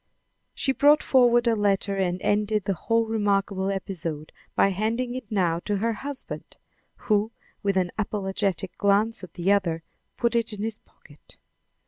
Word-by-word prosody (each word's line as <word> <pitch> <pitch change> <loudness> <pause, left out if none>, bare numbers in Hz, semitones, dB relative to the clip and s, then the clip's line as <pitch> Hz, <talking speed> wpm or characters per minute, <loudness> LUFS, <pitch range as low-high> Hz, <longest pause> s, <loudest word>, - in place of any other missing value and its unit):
She 275 - +1
brought 290 +3 +5
forward 240 -2 +4
a 230 - +4
letter 200 -1 +1
and 180 -1 0
ended 210 0 +1
the 195 - +1
whole 230 +6 +1
remarkable 200 -3 0
episode 170 -6 -4 0.2
by - - +4
handing 225 +6 -1
it 255 -2 -7
now 175 -5 +1
to 205 -1 0
her 230 +3 0
husband, 280 +4 -7 0.5
who, 215 +1 +2 0.3
with 200 -2 0
an 180 -2 +1
apologetic 195 -3 -2
glance 205 +2 +2
at 180 - -10
the 180 +3 +1
other, 170 -5 +1 0.3
put 235 0 +1
it 230 -1 0
in 205 0 -5
his 220 -1 -3
pocket. 145 -1 -20
205 Hz, 155 wpm, -25 LUFS, 190-225 Hz, 0.5 s, brought